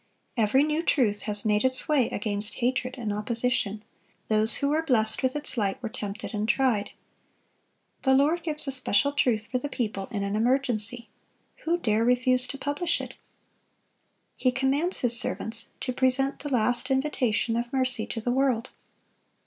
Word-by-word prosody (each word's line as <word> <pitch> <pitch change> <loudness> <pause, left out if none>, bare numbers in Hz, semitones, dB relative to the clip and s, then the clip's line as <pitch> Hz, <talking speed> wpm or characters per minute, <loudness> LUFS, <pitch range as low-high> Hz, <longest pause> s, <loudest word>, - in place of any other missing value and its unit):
Every 230 +4 +3
new 305 +1 0
truth 225 -11 +1
has 205 0 +3
made 210 0 +2
its 260 0 +2
way 285 -6 +3
against 205 0 -3
hatred 255 +1 -1
and 220 -4 -3
opposition; 220 -1 -1 0.5
those 215 +1 +2
who 280 - 0
were 310 +2 +2
blessed 235 -9 +1
with 260 +1 0
its 295 -3 -2
light 195 -2 -1
were 230 - -2
tempted 205 +1 -6
and 210 +1 -2
tried. 245 -7 +2 1.1
The 265 -1 +4
Lord 300 +6 +3
gives 300 -3 -4
a - - 0
special 265 +1 +2
truth 240 -6 +1
for 255 - 0
the 290 - -5
people 210 -7 -3
in 205 -4 -3
an 200 +1 -2
emergency. 235 -1 0 0.6
Who 335 +2 +2
dare 220 -8 +1
refuse 250 +1 +2
to 275 - -6
publish 290 +5 -1
it? - - -7 1.2
He 255 - +1
commands 275 +7 0
His 235 -2 +4
servants 230 -1 -2
to 255 - -2
present 270 +2 +2
the 290 - -5
last 245 +1 0
invitation 255 -5 0
of 235 +1 -2
mercy 255 -4 -1
to 225 - -4
the 245 +2 -1
world. 260 -2 +1
250 Hz, 165 wpm, -27 LUFS, 220-270 Hz, 1.2 s, The